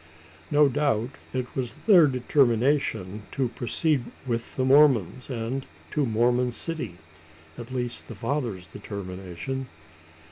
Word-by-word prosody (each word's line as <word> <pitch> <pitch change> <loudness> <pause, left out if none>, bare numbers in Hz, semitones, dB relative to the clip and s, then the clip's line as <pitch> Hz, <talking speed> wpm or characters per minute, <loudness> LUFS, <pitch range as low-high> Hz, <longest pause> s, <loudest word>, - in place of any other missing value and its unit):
No 150 0 +5
doubt 135 -4 0 0.2
it 125 -1 -4
was 125 -3 -2
their 180 -8 +8
determination 125 - +1
to 130 -3 0
proceed 135 +2 0 0.2
with 115 -2 -3
the 130 - +1
Mormons, 130 - +4
and 125 +2 -3 0.3
to 150 - 0
the - - -2
Mormon 120 +2 +2
city 125 - -3 0.6
at 120 0 -8
least 125 -2 -3
the 115 - -8
father's 115 -5 -2
determination. 95 +7 -6
125 Hz, 120 wpm, -26 LUFS, 115-140 Hz, 0.6 s, their